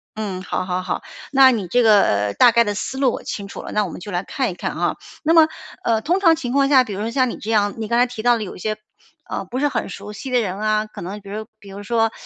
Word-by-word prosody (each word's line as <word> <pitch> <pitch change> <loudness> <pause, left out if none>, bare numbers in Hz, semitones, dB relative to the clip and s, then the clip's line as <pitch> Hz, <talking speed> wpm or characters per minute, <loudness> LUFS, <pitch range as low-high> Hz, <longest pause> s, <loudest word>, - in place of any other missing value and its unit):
嗯， 195 -4 -4
好 185 - -2
好 180 0 -2
好， - - -3 0.3
那 270 -1 +7
你 210 -7 -2
这 245 +6 +3
个 105 - +3
大 245 - +7
概 235 0 +4
的 205 - -1
思 265 - -4
路 265 -2 +3
我 - - -6
清 200 -2 -5
楚 - - -8
了， - - -7
那 210 -1 +1
我 - - -5
们 - - -8
就 205 - -7
来 175 0 -1
看 255 +1 -2
一 - - -6
看 180 - -4
啊。 - - 0 0.3
那 325 +1 +3
么， 325 -2 +7 0.4
呃， 225 -1 +2
通 350 - +1
常 335 -4 +5
情 255 -7 -4
况 275 +1 +3
下， 270 -2 +6
比 225 - -8
如 190 - -5
说 215 +2 -2
像 255 +1 +1
你 - - -6
这 215 - -7
样， 205 -2 +2
你 220 -1 -4
刚 235 - +1
才 245 - +5
提 245 -3 -7
到 240 +1 +4
了 225 - -3
有 195 - -8
一 - - -12
些， 215 +3 -2 0.5
呃， - - -3
不 240 +7 -5
是 290 +2 +2
很 - - -2
熟 200 +2 -8
悉 210 +6 -7
的 250 -1 +2
人 195 -2 -3
啊， 215 0 +1
可 215 - -11
能 195 +5 -6
比 200 - -12
如 215 +2 -5
比 205 -2 -14
如 195 +1 -8
说， 225 +1 +1
220 Hz, 325 characters per minute, -21 LUFS, 200-250 Hz, 0.5 s, 那